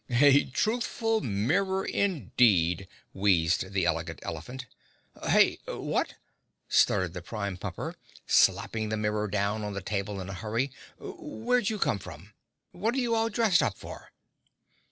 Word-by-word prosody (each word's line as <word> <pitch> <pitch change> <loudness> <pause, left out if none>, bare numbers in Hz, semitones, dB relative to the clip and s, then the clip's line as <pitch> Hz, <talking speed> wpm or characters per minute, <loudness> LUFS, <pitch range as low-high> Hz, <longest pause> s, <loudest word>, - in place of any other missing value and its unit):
"A 140 0 +6
truthful 225 - 0
mirror, 180 - 0
indeed," 100 - +2 0.3
wheezed 95 -1 +2
the 95 -3 +1
Elegant - - -1
Elephant. 125 +12 -6 0.6
"Heh? - - +4
What?" - - -2 0.5
stuttered 95 -3 +3
the 90 - -6
Prime 100 0 -4
Pumper, 90 - -5 0.3
slapping 110 -1 +2
the 110 - -1
mirror 105 0 -1
down 105 +2 -1
on 105 -1 -4
the 100 - -3
table 100 0 -3
in 95 - -6
a 95 - -6
hurry. 115 +7 -2 0.3
"Where'd 250 - -2
you 220 - -2
come 105 - +1
from? 90 +3 -11 0.4
What 220 +7 -1
are - - -1
you 240 -3 +1
all 225 0 +2
dressed 225 -7 +3
up 100 - -1
for?" - - -10
110 Hz, 140 wpm, -28 LUFS, -, 0.6 s, A